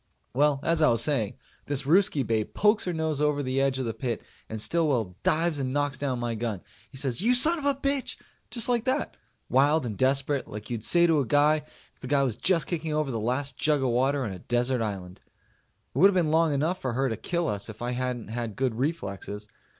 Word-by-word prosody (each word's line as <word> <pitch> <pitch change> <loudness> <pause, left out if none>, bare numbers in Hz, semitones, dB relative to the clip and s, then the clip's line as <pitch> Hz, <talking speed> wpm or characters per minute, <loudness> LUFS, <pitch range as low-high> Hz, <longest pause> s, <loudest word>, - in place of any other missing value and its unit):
Well, 140 +1 +2
as 165 0 +1
I 155 - +5
was 115 -1 +5
saying, 125 -9 0 0.3
this 140 -1 -1
Ruskie 160 -2 +3
babe 110 -2 -1
pokes 210 +1 +3
her 180 - -1
nose 160 -3 -2
over 150 -1 +1
the 130 +1 0
edge 135 -1 +1
of 130 - -2
the 115 - -2
pit 120 -2 -4 0.3
and 110 - -5
Stillwell 125 - +1
dives 160 -1 +1
and 130 -1 -2
knocks 145 -1 0
down 135 -3 -1
my 120 -1 -2
gun. 110 -4 -3 0.3
He 135 - -12
says, 130 +1 -2
"You 240 +4 +3
son 320 +7 +5
of 285 - -6
a 285 -1 +3
bitch!" 275 0 -1 0.3
Just 235 -2 0
like 240 -2 0
that. 265 +3 -1 0.3
Wild 145 +3 +3
and 110 -3 -4
desperate, 135 +3 +1
like 105 +3 -8
you'd 115 -3 -3
say 175 +5 +4
to 165 -3 +3
a 140 - 0
guy 145 +5 +4 0.4
if - - -27
the 130 - -8
guy 140 +1 +2
was 125 -5 -1
just 170 +6 +2
kicking 160 -3 -3
over 155 -3 0
the 115 - -2
last 130 +5 -2
jug 150 -3 +1
of 130 - +1
water 135 +3 +1
on 110 - -3
a 95 - -8
desert 120 +4 0
island. 95 -4 -5 0.7
It 130 - -2
would 190 - +8
have 200 - +1
been 165 -4 +2
long 165 0 +3
enough 155 +6 -1
for 130 -2 -2
her 135 +3 +1
to 115 - -2
kill 170 - -2
us 105 0 -3
if 110 - -9
I 120 - -2
hadn't 125 -3 -3
had 115 -2 -4
good 130 -3 0
reflexes. 105 - -4
135 Hz, 235 wpm, -27 LUFS, 120-160 Hz, 0.7 s, would